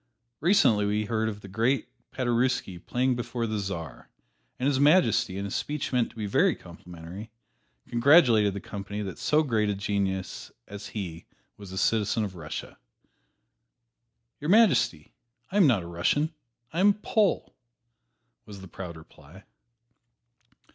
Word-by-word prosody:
Recently 115 Hz, -, +4 dB
we 105 Hz, +1 st, 0 dB
heard 110 Hz, 0 st, 0 dB
of 105 Hz, -1 st, -7 dB
the 100 Hz, -, -10 dB
great 115 Hz, +5 st, 0 dB, 0.2 s
Paderewski 120 Hz, -7 st, 0 dB
playing 125 Hz, +1 st, 0 dB
before 120 Hz, 0 st, -3 dB
the 110 Hz, -1 st, -2 dB
Czar, 85 Hz, -8 st, -6 dB, 0.5 s
and 125 Hz, -, -3 dB
His 140 Hz, -2 st, +2 dB
Majesty, 140 Hz, -, +3 dB
in 100 Hz, -, -3 dB
a 100 Hz, -, -5 dB
speech 145 Hz, +4 st, -3 dB
meant 125 Hz, -2 st, +2 dB
to -, -, -20 dB
be 110 Hz, -2 st, -4 dB
very 100 Hz, -, +3 dB
complimentary, 90 Hz, +4 st, -11 dB, 0.6 s
congratulated 120 Hz, -, +5 dB
the 100 Hz, -, -5 dB
company 100 Hz, +1 st, -6 dB
that 95 Hz, -3 st, -7 dB
so 155 Hz, +1 st, +2 dB
great 110 Hz, -7 st, +1 dB
a 100 Hz, -, 0 dB
genius 95 Hz, -2 st, -3 dB, 0.2 s
as 100 Hz, +1 st, -8 dB
he 85 Hz, -4 st, -6 dB, 0.3 s
was 100 Hz, -2 st, -11 dB
a 95 Hz, -, -6 dB
citizen 110 Hz, +1 st, +1 dB
of 100 Hz, -3 st, -4 dB
Russia. 80 Hz, -3 st, -7 dB, 1.6 s
"Your 150 Hz, -, -4 dB
Majesty, 170 Hz, -, +3 dB, 0.4 s
I 200 Hz, -, -1 dB
am 190 Hz, -6 st, +6 dB
not 110 Hz, -9 st, +2 dB
a -, -, -8 dB
Russian 145 Hz, -, 0 dB, 0.4 s
I 170 Hz, -, -2 dB
am 200 Hz, +2 st, +6 dB
a -, -, +5 dB
Pole!" 210 Hz, -1 st, 0 dB, 0.9 s
was 100 Hz, -2 st, -10 dB
the 95 Hz, -, -10 dB
proud 85 Hz, -1 st, -8 dB
reply. 80 Hz, +4 st, -16 dB
105 Hz, 150 wpm, -27 LUFS, 95-130 Hz, 1.6 s, am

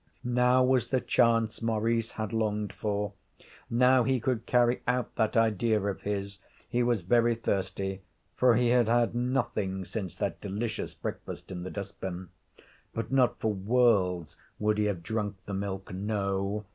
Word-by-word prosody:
Now 125 Hz, +1 st, +3 dB
was 125 Hz, -2 st, +2 dB
the 130 Hz, +1 st, +1 dB
chance 115 Hz, -2 st, +2 dB
Maurice 115 Hz, 0 st, 0 dB
had 110 Hz, -1 st, -4 dB
longed 105 Hz, -2 st, -1 dB
for. 105 Hz, -1 st, -2 dB, 0.6 s
Now 125 Hz, +2 st, +5 dB
he 130 Hz, +1 st, +1 dB
could 120 Hz, -1 st, -1 dB
carry 120 Hz, 0 st, +3 dB
out 125 Hz, 0 st, 0 dB
that 110 Hz, +2 st, +1 dB
idea 110 Hz, 0 st, +3 dB
of 100 Hz, -1 st, -3 dB
his. 100 Hz, -1 st, -3 dB, 0.3 s
He 125 Hz, 0 st, 0 dB
was 120 Hz, -6 st, +1 dB
very 120 Hz, +5 st, +3 dB
thirsty, 95 Hz, -3 st, -2 dB, 0.3 s
for 125 Hz, -2 st, +4 dB
he 120 Hz, +1 st, +3 dB
had 120 Hz, -2 st, +4 dB
had 120 Hz, 0 st, +2 dB
nothing 120 Hz, -6 st, -1 dB
since 95 Hz, -2 st, -5 dB
that -, -, -3 dB
delicious 105 Hz, +3 st, -3 dB
breakfast -, -, -6 dB
in 90 Hz, -2 st, -5 dB
the 90 Hz, -, -5 dB
dust 100 Hz, 0 st, -7 dB
bin. 90 Hz, -1 st, -5 dB, 0.7 s
But 115 Hz, -, -3 dB
not 130 Hz, -2 st, +3 dB
for 110 Hz, -1 st, 0 dB
worlds 95 Hz, -6 st, +2 dB, 0.2 s
would 105 Hz, 0 st, +1 dB
he 105 Hz, -, +2 dB
have 95 Hz, -5 st, -2 dB
drunk 105 Hz, 0 st, -2 dB
the 100 Hz, -, -5 dB
milk. 95 Hz, -1 st, -4 dB
No. 100 Hz, +1 st, -2 dB
110 Hz, 160 wpm, -29 LUFS, 100-120 Hz, 0.7 s, Now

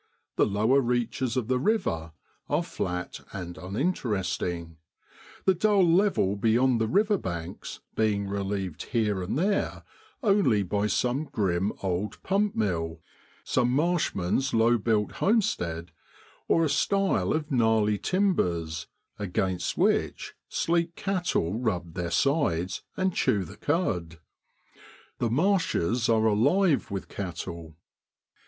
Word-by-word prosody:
The -, -, +3 dB
lower 110 Hz, +7 st, +3 dB
reaches 120 Hz, 0 st, -1 dB
of 120 Hz, -4 st, -1 dB
the 130 Hz, 0 st, +1 dB
river 85 Hz, -, 0 dB, 0.4 s
are -, -, +1 dB
flat 90 Hz, 0 st, -4 dB
and 90 Hz, -3 st, -6 dB
uninteresting, 95 Hz, -, -2 dB, 0.7 s
the 190 Hz, -, +5 dB
dull 195 Hz, 0 st, +3 dB
level 170 Hz, -, +3 dB
beyond 115 Hz, +3 st, +2 dB
the 110 Hz, -, +2 dB
river 205 Hz, -, +2 dB
banks 85 Hz, -3 st, -6 dB
being 105 Hz, -2 st, +1 dB
relieved 100 Hz, -3 st, -3 dB
here 105 Hz, -5 st, +1 dB
and 95 Hz, +8 st, -2 dB
there 195 Hz, +5 st, 0 dB, 0.4 s
only 195 Hz, -, +3 dB
by 100 Hz, +3 st, 0 dB
some 125 Hz, +7 st, 0 dB
grim 95 Hz, -, 0 dB
old 95 Hz, +2 st, -2 dB
pump 200 Hz, +1 st, +1 dB
mill, 80 Hz, -6 st, -1 dB, 0.4 s
some 125 Hz, -1 st, +1 dB
marshman's 135 Hz, -, +1 dB
low 115 Hz, +1 st, +4 dB
built 105 Hz, -1 st, +1 dB
homestead, 85 Hz, -, 0 dB, 0.6 s
or 165 Hz, -, +3 dB
a -, -, 0 dB
stile 185 Hz, -, +1 dB
of 155 Hz, 0 st, -2 dB
gnarly 110 Hz, -4 st, +2 dB
timbers, 90 Hz, -, 0 dB, 0.3 s
against 95 Hz, -2 st, -1 dB
which -, -, +1 dB, 0.2 s
sleek 170 Hz, 0 st, 0 dB
cattle 175 Hz, -, -1 dB
rub 90 Hz, -9 st, -2 dB
their 90 Hz, -1 st, -3 dB
sides 95 Hz, -, +1 dB, 0.2 s
and 185 Hz, -1 st, +1 dB
chew 100 Hz, -, +1 dB
the 85 Hz, -, -10 dB
cud. 90 Hz, -, -1 dB, 1.0 s
The 120 Hz, -, +1 dB
marshes 125 Hz, -, +1 dB
are 110 Hz, -1 st, +3 dB
alive 140 Hz, -, +3 dB
with 100 Hz, -2 st, -4 dB
cattle. 85 Hz, -4 st, -6 dB
110 Hz, 120 wpm, -27 LUFS, -, 1.0 s, the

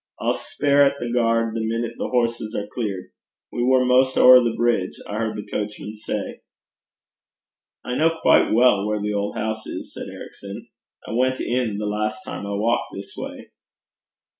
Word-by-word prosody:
I'll -, -, +1 dB
speir 145 Hz, 0 st, +1 dB
at 140 Hz, 0 st, +3 dB
the 120 Hz, -1 st, -3 dB
gaird, 115 Hz, -1 st, +2 dB
the 115 Hz, -, -2 dB
minute 115 Hz, +1 st, -2 dB
the -, -, -1 dB
horses 115 Hz, -2 st, -1 dB
are 105 Hz, -, -2 dB
clear. 100 Hz, -6 st, -4 dB, 0.4 s
We 120 Hz, -, -3 dB
war 130 Hz, +1 st, +4 dB
'maist 130 Hz, +1 st, +3 dB
ower 125 Hz, 0 st, +9 dB
the 115 Hz, -1 st, 0 dB
brig, 120 Hz, -6 st, +1 dB, 0.2 s
I 105 Hz, -, -4 dB
heard 110 Hz, -1 st, -2 dB
the 105 Hz, -, -6 dB
coachman 105 Hz, 0 st, -5 dB
say.' 110 Hz, -, -5 dB, 1.4 s
'I 125 Hz, -, -3 dB
know 165 Hz, +1 st, +2 dB
quite -, -, +4 dB
well 110 Hz, -3 st, +4 dB
where 105 Hz, 0 st, -1 dB
the 105 Hz, +1 st, -2 dB
old 100 Hz, 0 st, -2 dB
house 110 Hz, 0 st, -3 dB
is,' -, -, -7 dB
said -, -, -7 dB
Ericson. 100 Hz, 0 st, -9 dB, 0.4 s
'I -, -, -6 dB
went 130 Hz, +3 st, +1 dB
in 120 Hz, -4 st, -1 dB
the 105 Hz, -, -3 dB
last 105 Hz, +1 st, -2 dB
time 100 Hz, -, -6 dB
I 100 Hz, -, -3 dB
walked 115 Hz, +4 st, 0 dB
this 100 Hz, 0 st, -8 dB
way.' -, -, -8 dB
115 Hz, 180 wpm, -23 LUFS, 105-125 Hz, 1.4 s, ower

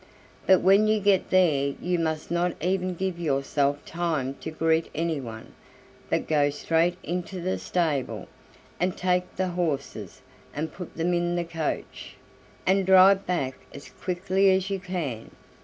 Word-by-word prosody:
"But 190 Hz, -1 st, +6 dB
when 195 Hz, +3 st, +5 dB
you 215 Hz, 0 st, +3 dB
get 200 Hz, -2 st, +2 dB
there 145 Hz, -7 st, +3 dB
you 180 Hz, 0 st, -1 dB
must 160 Hz, -1 st, -2 dB
not 175 Hz, 0 st, 0 dB
even 185 Hz, 0 st, -1 dB
give 185 Hz, -1 st, -3 dB
yourself 140 Hz, -1 st, 0 dB
time 160 Hz, -6 st, -2 dB
to -, -, -4 dB
greet 160 Hz, +1 st, +1 dB
anyone, 140 Hz, -9 st, -4 dB, 0.6 s
but -, -, 0 dB
go 145 Hz, -2 st, +3 dB
straight 165 Hz, +4 st, +1 dB
into 180 Hz, +2 st, -4 dB
the 185 Hz, +2 st, -2 dB
stable, 155 Hz, -7 st, -1 dB, 0.5 s
and 180 Hz, +1 st, 0 dB
take 180 Hz, 0 st, 0 dB
the 185 Hz, 0 st, -1 dB
horses, 140 Hz, -, -3 dB, 0.3 s
and 155 Hz, +2 st, -3 dB
put 180 Hz, -3 st, -9 dB
them 170 Hz, +2 st, +1 dB
in 175 Hz, 0 st, 0 dB
the 175 Hz, -1 st, -1 dB
coach, 165 Hz, -2 st, -4 dB, 0.5 s
and 195 Hz, +1 st, +3 dB
drive 190 Hz, +1 st, +6 dB
back 140 Hz, -8 st, -1 dB, 0.2 s
as 140 Hz, -, -10 dB
quickly 190 Hz, +2 st, +1 dB
as 190 Hz, +1 st, +1 dB
you 195 Hz, -, -1 dB
can. 170 Hz, -, -4 dB
175 Hz, 150 wpm, -26 LUFS, 155-185 Hz, 0.6 s, But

